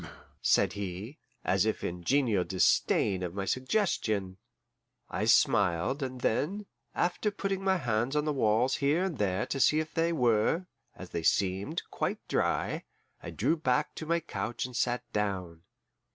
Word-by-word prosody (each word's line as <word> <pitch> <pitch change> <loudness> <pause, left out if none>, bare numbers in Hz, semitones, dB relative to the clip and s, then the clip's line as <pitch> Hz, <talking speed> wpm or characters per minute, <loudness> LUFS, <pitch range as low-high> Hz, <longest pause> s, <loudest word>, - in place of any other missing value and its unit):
"Poom!" - - -9 0.3
said - - +3
he, 100 - -6 0.3
as 95 +1 +3
if 110 0 -1
in 90 0 -4
genial 115 -5 +2
disdain 95 +1 +2
of 90 0 -4
my 100 -1 -2
suggestion. 110 - 0 0.7
I 105 - -1
smiled, 105 - +3
and 130 -2 -4
then, 195 - 0 0.3
after 180 +4 0
putting 195 -1 -3
my 190 -1 +3
hands 120 -2 -1
on 150 0 +1
the 150 - 0
walls 120 0 +2
here 150 +5 +2
and 180 -8 -3
there 95 -1 0
to 135 - -3
see 150 +3 +4
if 155 0 -4
they 165 +1 +1
were, 125 - +2 0.3
as - - -10
they 85 - -2
seemed, 95 - 0
quite - - -3
dry, - - 0 0.4
I - - -7
drew 165 - +1
back 150 -2 0
to 160 - -7
my 170 +1 +1
couch 110 -6 -4
and 125 -1 -8
sat 120 +1 0
down. 95 -5 -2
120 Hz, 165 wpm, -30 LUFS, 100-155 Hz, 0.7 s, see